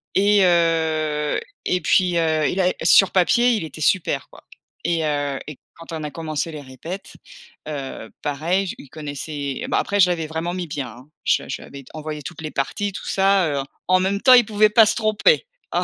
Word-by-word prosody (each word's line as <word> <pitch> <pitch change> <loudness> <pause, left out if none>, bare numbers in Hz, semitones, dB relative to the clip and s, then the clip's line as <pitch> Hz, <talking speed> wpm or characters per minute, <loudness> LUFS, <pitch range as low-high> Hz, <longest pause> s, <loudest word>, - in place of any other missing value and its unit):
et 200 0 +4
heu, 160 -3 +1 0.3
et 180 -1 0
puis, 180 +1 +2
heu, 160 -2 +2
il 190 - 0
a 180 0 +3
sur 180 +3 +6
papier, 240 +7 +3
il 210 - -2
était 155 0 -10
super, 185 +2 +1
quoi - - -16 0.4
et 170 -2 +1
heu, 145 -2 -1
et 150 -3 -9 0.2
quand 165 0 -12
on 160 -1 -4
a 150 - -5
commencé 160 0 -3
les 150 -2 -7
répètes, 145 +8 -8 0.5
heu, 135 -6 -6
pareil, 165 +7 -1
je - - -5
il 140 - -13
connaissait 145 -2 -5
bah, - - +2
après 205 0 -1
je 180 -1 +6
l'avais 165 -3 -1
vraiment 165 +2 -3
mis 180 -2 -4
bien, 140 -2 -4
hein, 125 +6 -14 0.2
je - - +2
lui - - -12
je - - -4
lui - - -12
avais 140 -1 -10
envoyé 155 -1 -6
toutes 160 +2 -8
les 155 -1 -5
parties 200 +9 -2
tout 195 - -8
ça, 195 -2 +3
heu, - - -5 0.2
en 185 0 +4
même 195 +2 0
temps, 255 - +7
il 245 -3 +7
pouvait 215 0 +3
pas 220 +1 +6
se - - +1
tromper, 225 - +2 0.3
hein! - - +1
165 Hz, 210 wpm, -22 LUFS, 150-190 Hz, 0.5 s, temps